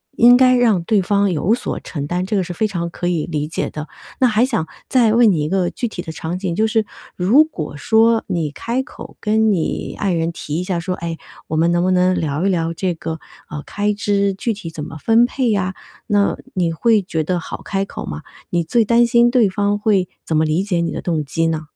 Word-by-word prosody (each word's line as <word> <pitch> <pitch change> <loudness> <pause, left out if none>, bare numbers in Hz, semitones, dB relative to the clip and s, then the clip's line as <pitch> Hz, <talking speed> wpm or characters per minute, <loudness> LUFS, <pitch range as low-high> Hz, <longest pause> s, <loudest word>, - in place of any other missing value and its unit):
应 245 +1 +7
该 255 -1 +5
让 225 -7 +3
对 215 -1 +3
方 200 +1 +1
有 175 +8 +1
所 245 - -3
承 145 -3 -5
担， 180 +3 -1
这 205 +1 -1
个 190 - +1
是 175 - -5
非 215 - 0
常 170 -4 -3
可 175 +1 -4
以 165 -4 -1
理 150 -2 -3
解 - - -2
的。 150 0 -7 0.3
那 255 - +6
还 225 +2 +3
想 225 -11 -1 0.2
再 235 -5 +3
问 235 -1 +5
你 170 -6 +1
一 150 - -2
个 185 -2 +1
具 240 - -3
体 175 - -6
的 165 -3 -7
场 165 +3 -4
景， 180 -3 -2
就 220 +2 +2
是 220 0 +1 0.3
如 220 +12 +5
果 160 - -6
说 225 +8 +3
你 160 -4 -1
开 235 - -2
口 - - -11
跟 220 0 +2
你 175 -5 -2
爱 195 -3 0
人 165 0 0
提 150 -2 -6
一 - - -3
下 180 -2 -2
说， 180 +2 -3
哎， 170 -2 -5 0.3
我 155 - -1
们 165 +2 +3
能 175 0 +2
不 185 - +2
能 185 0 +3
聊 155 +2 -1
一 195 - +3
聊 165 -2 0
这 180 +1 -1
个， 160 0 -5 0.3
呃， 150 -1 -5
开 205 0 -1
支 200 -1 0
具 225 +4 -2
体 195 -5 -8
怎 150 -2 -6
么 - - -9
分 225 +8 +4
配 250 -1 -1
呀， 190 -2 -1 0.3
那 205 -2 +2 0.2
你 175 -3 0
会 220 +6 +2
觉 160 -4 -3
得 180 +1 -1
好 - - -7
开 195 0 -2
口 - - -7
吗？ 75 0 -6 0.3
你 175 -1 +1
最 225 +8 +2
担 235 +2 +4
心 235 0 +4
对 240 -5 +3
方 205 +1 0
会 205 -3 +1 0.2
怎 160 - 0
么 160 - +3
理 155 +4 +1
解 190 -4 -1
你 170 0 -1
的 - - -4
动 160 -4 -1
机 165 +4 0
呢？ 160 -1 -2
185 Hz, 260 characters per minute, -19 LUFS, 165-220 Hz, 0.3 s, 应